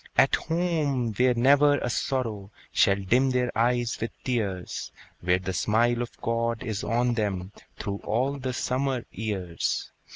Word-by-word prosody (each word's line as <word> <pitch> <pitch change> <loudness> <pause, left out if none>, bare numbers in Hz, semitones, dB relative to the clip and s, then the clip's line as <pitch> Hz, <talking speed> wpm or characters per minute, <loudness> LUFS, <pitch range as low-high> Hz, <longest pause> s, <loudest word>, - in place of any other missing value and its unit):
At 135 - +5
home, 155 -8 0
where 125 +3 +3
never 140 +4 +5
a 125 - -2
sorrow 115 -7 -2 0.2
Shall 100 - +4
dim 120 +7 +2
their 125 -1 0
eyes 120 +1 +1
with 115 - -1
tears! 100 -8 -2 0.3
Where 90 +1 +2
the 95 0 -4
smile 115 +7 +2
of 120 - -6
God 115 0 -1
is 110 -5 -3
on 120 +2 +1
them 100 -4 -2 0.3
Through 100 0 -4
all 130 +6 0
the 130 -1 -2
summer 130 0 -1
years! 95 -6 -2
120 Hz, 150 wpm, -27 LUFS, 105-130 Hz, 0.3 s, At